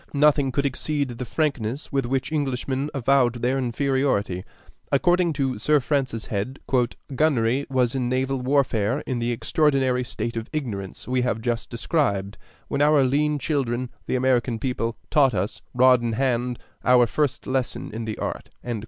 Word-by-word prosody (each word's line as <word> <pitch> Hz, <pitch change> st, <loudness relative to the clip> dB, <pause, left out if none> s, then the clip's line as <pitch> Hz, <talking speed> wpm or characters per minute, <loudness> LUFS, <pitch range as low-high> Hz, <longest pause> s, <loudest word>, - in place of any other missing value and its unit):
Nothing 145 Hz, -2 st, +4 dB
could 140 Hz, +1 st, 0 dB
exceed 140 Hz, +1 st, -1 dB
the 120 Hz, +1 st, -5 dB
frankness 140 Hz, -2 st, -2 dB
with 135 Hz, -4 st, 0 dB
which 130 Hz, +3 st, -1 dB
Englishmen 135 Hz, -1 st, -1 dB
avowed 135 Hz, -2 st, +2 dB
their 130 Hz, +2 st, +2 dB
inferiority. 125 Hz, -7 st, 0 dB, 0.5 s
According 175 Hz, +3 st, +3 dB
to 135 Hz, -5 st, -1 dB
Sir 150 Hz, +6 st, +3 dB
Francis 135 Hz, -4 st, -1 dB
Head, 110 Hz, +6 st, -3 dB, 0.5 s
"gunnery 135 Hz, -2 st, +2 dB
was 125 Hz, -3 st, +1 dB
in 125 Hz, -2 st, -1 dB
naval 130 Hz, +1 st, 0 dB
warfare 125 Hz, -2 st, +1 dB
in 130 Hz, -3 st, -3 dB
the 120 Hz, +1 st, 0 dB
extraordinary 130 Hz, 0 st, +1 dB
state 115 Hz, -1 st, -4 dB
of 115 Hz, -1 st, -4 dB
ignorance 105 Hz, -11 st, -5 dB
we 125 Hz, 0 st, +1 dB
have 125 Hz, -3 st, 0 dB
just 115 Hz, 0 st, -2 dB
described, 110 Hz, -, -1 dB, 0.3 s
when 140 Hz, -, -1 dB
our 150 Hz, -1 st, +5 dB
lean 150 Hz, +3 st, +2 dB
children, 130 Hz, -5 st, -1 dB, 0.2 s
the -, -, 0 dB
American 125 Hz, -2 st, +2 dB
people, 115 Hz, -2 st, -2 dB
taught 140 Hz, -4 st, +4 dB
us, 95 Hz, +3 st, -2 dB
rod 125 Hz, 0 st, +6 dB
in 115 Hz, -1 st, -1 dB
hand, 125 Hz, 0 st, 0 dB, 0.3 s
our 125 Hz, -1 st, +6 dB
first 140 Hz, +2 st, -1 dB
lesson 130 Hz, -2 st, -2 dB
in 115 Hz, +1 st, -4 dB
the 110 Hz, -1 st, -4 dB
art." -, -, -4 dB
130 Hz, 155 wpm, -24 LUFS, 120-140 Hz, 0.5 s, rod